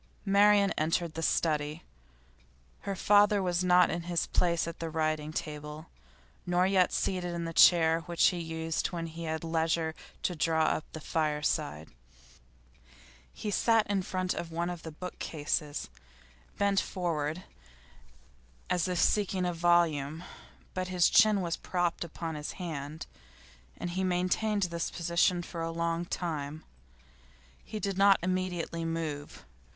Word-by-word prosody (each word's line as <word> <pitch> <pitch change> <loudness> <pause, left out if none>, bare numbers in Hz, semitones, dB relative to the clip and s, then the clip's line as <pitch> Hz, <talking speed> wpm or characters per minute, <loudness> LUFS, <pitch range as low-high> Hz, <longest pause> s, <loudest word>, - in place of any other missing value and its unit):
Marian 200 0 +5
entered 165 +1 0
the 165 - -4
study. 150 -2 0 1.1
Her 195 - -1
father 205 +2 +4
was 180 -1 0
not 180 0 +5
in 170 - -2
his 170 0 -1
place 170 -2 +1
at 165 - -7
the 165 - -3
writing 155 -1 -1
table, 150 0 -6 0.5
nor 180 +1 +2
yet 190 -1 +3
seated 180 -2 -1
in 170 -1 -3
the 165 - -4
chair 165 -1 +6
which 170 -1 +4
he 180 - -4
used 160 -1 -2
when 170 -2 -4
he 165 +1 -7
had 160 0 -3
leisure 160 0 0 0.3
to 180 - 0
draw 160 0 +2
up 155 0 0
to - - -32
the 155 -3 -8
fireside; 150 - -1 1.4
he 210 - -5
sat 225 +1 +3
in 200 -2 0
front 185 0 -2
of 165 - -5
one 170 +2 -2
of 175 -2 -7
the 165 - -7
bookcases, 150 -3 -3 0.7
bent 200 -1 +2
forward 165 -2 -2 1.3
as 180 -1 +1
if 180 -1 -1
seeking 190 -1 +2
a 175 - 0
volume, 165 -3 +2 0.5
but 185 0 -2
his 180 -1 +3
chin 210 -2 +5
was 170 -2 -2
propped 175 -2 -1
upon 165 0 -5
his 150 -1 -5
hand, 155 -3 -6 0.7
and 175 - -4
he 185 +2 -2
had 190 - +1
maintained 195 +4 +1
this 170 -2 -2
position 175 +1 +1
for 170 -1 -6
a 165 - -2
long 170 +1 -1
time. 155 -3 -4 1.0
He 215 - -6
did 195 -2 -2
not 195 0 +7
immediately 180 -2 -2
move. 160 -3 -4
170 Hz, 145 wpm, -30 LUFS, 160-185 Hz, 1.4 s, not